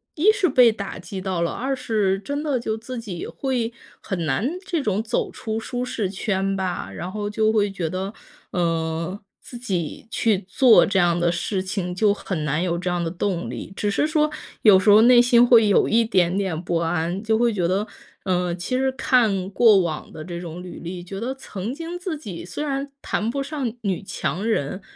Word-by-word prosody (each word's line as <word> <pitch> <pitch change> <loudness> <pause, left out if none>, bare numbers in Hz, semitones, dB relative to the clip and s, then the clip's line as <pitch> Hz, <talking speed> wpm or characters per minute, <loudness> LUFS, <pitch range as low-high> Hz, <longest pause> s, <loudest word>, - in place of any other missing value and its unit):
一 360 +8 +5
是 410 -4 +1
被 250 -5 +6
打 200 -3 -6
击 185 +2 -7
到 185 -2 -2
了， 170 - 0
二 270 +2 -2
是 210 -6 0
真 285 +8 -4
的 295 -4 0
就 220 -2 -2
自 250 +3 -7
己 195 -7 -6
会 245 -4 -2 0.3
很 180 -5 -3
难 155 - 0 0.2
这 340 -6 -1
种 210 -3 0
走 235 +1 -1
出 220 -3 -4
舒 245 +2 -4
适 225 -6 -2
圈 195 0 -1
吧。 185 - -3
然 175 - -6
后 205 0 -3
就 215 +1 +2
会 210 -2 +2
觉 180 -4 -3
得， 190 +4 -4 0.4
嗯， 165 +1 -1 0.2
自 245 - -10
己 190 -5 -3
去 220 -3 +1
做 245 +4 +6
这 195 - 0
样 175 -1 +3
的 170 0 +2
事 185 +3 -1
情， 185 -1 -3
就 200 +3 +3
很 180 -6 -4
难 150 +3 0
有 170 -2 0
这 180 +1 -2
样 175 -1 -1
的 165 - -2
动 185 0 -2
力。 - - -7
只 205 0 -1
是 295 - +1
说 305 -1 +1 0.3
有 205 -4 +7
时 190 - +2
候 210 +1 +8
内 240 +1 +7
心 240 0 +5
会 235 -3 +6
有 205 - +4
一 230 +1 +4
点 185 -4 +2
点 190 -5 -1
不 175 -1 0
安， 170 +2 -1
就 220 0 +1
会 240 +1 +3
觉 180 -4 0
得， 195 +4 0 0.4
嗯， 180 -2 0
其 185 +9 -2
实 265 0 +2
看 215 -8 +2
过 210 -1 +5
往 160 -4 -3
的 155 - -7
这 170 +1 -6
种 175 0 -7
履 180 -2 -9
历， 175 +1 -6
觉 195 +2 -7
得 250 +4 -3
曾 220 -4 -6
经 335 +4 -6
自 355 -4 -4
己 190 - -8
虽 180 +11 -5
然 280 -1 -2
谈 215 - -1
不 275 +3 -2
上 275 -5 -3
女 195 -4 -1
强 195 0 -3
人， 190 -3 -1
200 Hz, 225 characters per minute, -23 LUFS, 180-240 Hz, 0.4 s, 候